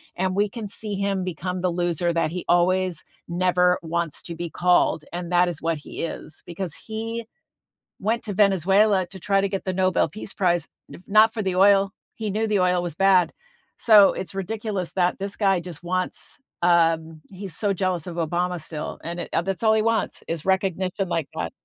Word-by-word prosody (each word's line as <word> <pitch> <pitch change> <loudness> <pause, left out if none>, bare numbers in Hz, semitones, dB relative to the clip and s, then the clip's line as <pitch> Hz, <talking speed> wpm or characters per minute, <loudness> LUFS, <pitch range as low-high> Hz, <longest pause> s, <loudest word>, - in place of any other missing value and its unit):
and 185 +1 -1
we 205 +1 +2
can 215 0 -6
see 210 +1 -4
him 195 -1 -1
become 180 +1 -4
the 185 - +1
loser 175 0 0
that 165 -1 0
he 180 0 -5
always 180 -1 +2 0.2
never 180 0 +2
wants 170 -1 -2
to 170 - -6
be 170 0 -4
called. 175 -3 +2
And 175 0 -5
that 180 0 +4
is 170 -3 -4
what 165 -1 0
he - - -7
is 160 -1 -7
because 175 -1 -4
he 225 +1 -5 0.8
went 225 +4 0
to 205 - -3
Venezuela 195 0 +3
to 190 0 -11
try 195 +1 +2
to 200 - +1
get 195 -1 -4
the 185 - -1
Nobel 185 -2 +2
peace 200 +5 -7
prize, 175 -3 +1 0.4
not 215 +2 +5
for 220 - -2
the 190 -2 -1
oil. 195 0 +5 0.2
He 215 -2 -4
knew 220 +3 0
the 205 -3 +1
oil 180 -1 +2
was 175 -4 -4
bad. 185 -2 +4 0.5
So 210 -4 +7
it's 190 - -6
ridiculous 200 -1 -3
that 180 0 +1
this 195 +1 -4
guy 195 -4 +2
just 175 -2 -9
wants, 185 +1 -3 0.2
um, 165 -2 +2
he's 190 -3 -5
so 205 -2 +1
jealous 185 -3 -1
of 175 -1 -6
Obama 175 +1 -1
still, 155 0 -6
and, 170 +1 -5
uh, 165 - +1
that's 195 +3 -3
all 220 -1 +5
he 215 - +2
wants 230 0 0
is 165 -2 -3
recognition 190 0 0
like 165 -4 -1
that. 80 0 -3
185 Hz, 195 wpm, -24 LUFS, 175-195 Hz, 0.8 s, So